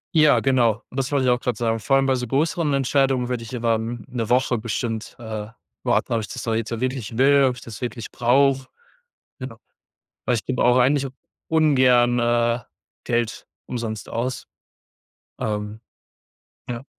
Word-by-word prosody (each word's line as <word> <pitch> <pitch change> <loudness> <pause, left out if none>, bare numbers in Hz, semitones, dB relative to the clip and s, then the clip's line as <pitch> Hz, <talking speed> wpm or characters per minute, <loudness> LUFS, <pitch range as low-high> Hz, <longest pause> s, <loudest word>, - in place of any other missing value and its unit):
Ja, 155 -2 +5
genau. 120 -4 +2
Und 130 - -9
das 130 - -2
wollte 140 -2 +1
ich 125 - +4
auch 125 - +2
grad 120 -3 -2
sagen 115 -1 0
Vor 135 +6 +1
allem 135 0 +3
bei 135 - +3
so 125 -1 -2
größeren 155 +4 0
Entscheidungen 135 -2 +1
würde 125 -2 -2
ich 115 +2 -7
aber 115 -1 +1
m 115 +1 -4
'ne 120 -4 -4
Woche 125 -1 +2
bestimmt, 115 0 -3
äh, 110 -2 -6 0.3
warten, - - +1
ob 115 - +2
ich 105 - -6
das - - -7
doch 115 - -1
jetzt 110 -1 -1
wirklich 125 -3 -3
will, 140 +1 +5
ob 125 -1 +1
ich 120 - -12
das 110 -4 -10
wirklich 120 -2 -5
brauche. 135 +2 +2 0.7
Genau. 130 -3 -7 0.7
Weil 125 - +2
ich 110 - -4
gebe 130 -2 -1
auch 125 +1 +4
eigentlich 135 +2 +3 0.4
ungern, 130 -6 +4
äh, 120 0 +2 0.4
Geld 120 -2 -2 0.2
umsonst 115 -3 -5
aus. 120 +1 -3 0.9
Ähm. 105 0 -3 0.9
Ja. 120 +1 -5
125 Hz, 175 wpm, -23 LUFS, 115-135 Hz, 0.9 s, Ja